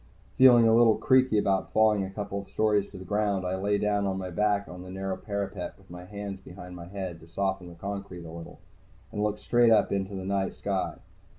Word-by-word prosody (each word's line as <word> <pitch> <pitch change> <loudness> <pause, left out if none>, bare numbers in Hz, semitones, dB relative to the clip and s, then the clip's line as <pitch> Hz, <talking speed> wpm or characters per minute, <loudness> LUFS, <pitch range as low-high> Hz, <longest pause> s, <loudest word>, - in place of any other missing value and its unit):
Feeling 120 -3 +7
a 110 - +5
little 115 -2 +6
creaky 130 -4 +3
about 95 -2 +1
falling 110 -2 +4
a 95 - -4
couple 100 0 -5
stories 105 -2 +1
to - - -11
the 95 - -9
ground, 100 -1 0
I 90 +1 -1
lay 100 +2 +1
down 105 -1 +1
on 95 -1 -1
my 95 -1 -5
back 100 +2 +1
on 90 0 -9
the 90 - -10
narrow 95 0 -3
parapet, 100 -3 -4
with 95 -2 -20
my 90 0 -9
hands 100 0 -6
behind 90 -1 -11
my 85 -1 -9
head 95 -3 -6
to 80 - -15
soften 95 +1 -2
the 85 - -12
concrete 100 -1 -6
a 80 - -8
little, 85 0 -9 0.5
and 105 -2 -3
looked 105 0 0
straight 120 -1 +4
up 110 - +4
into 100 0 -2
the 95 -1 -5
night 95 0 -1
sky. 100 -2 -2
100 Hz, 220 wpm, -28 LUFS, 95-105 Hz, 0.5 s, Feeling